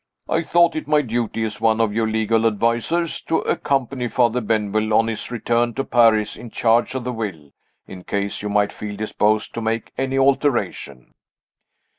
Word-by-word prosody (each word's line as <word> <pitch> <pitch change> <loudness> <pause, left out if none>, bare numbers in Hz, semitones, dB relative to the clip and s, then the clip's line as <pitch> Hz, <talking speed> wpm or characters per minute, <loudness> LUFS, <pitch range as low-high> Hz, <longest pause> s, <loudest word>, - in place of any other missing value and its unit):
I - - +1
thought 170 +1 +3
it 155 - -4
my 150 -1 +3
duty, 115 -2 -2
as 105 -1 -4
one 110 0 +3
of 110 -2 +1
your 110 0 0
legal 110 +1 +1
advisers, 115 +10 0
to 165 - +1
accompany 135 -2 -1
Father 120 0 +1
Benwell 110 0 0
on 115 - +4
his 115 -2 -4
return 120 0 0
to 135 - -1
Paris 115 -4 +3
in 120 - -10
charge 115 +3 +1
of 130 - -3
the 125 +1 -3
will 90 - -6 0.3
in 90 -1 -11
case 100 +1 -3
you 105 - -4
might 105 0 +1
feel 105 -1 -6
disposed 105 0 0
to 115 - -4
make 115 0 -2
any 135 0 -1
alteration." 135 - 0
115 Hz, 175 wpm, -21 LUFS, 105-125 Hz, 0.3 s, on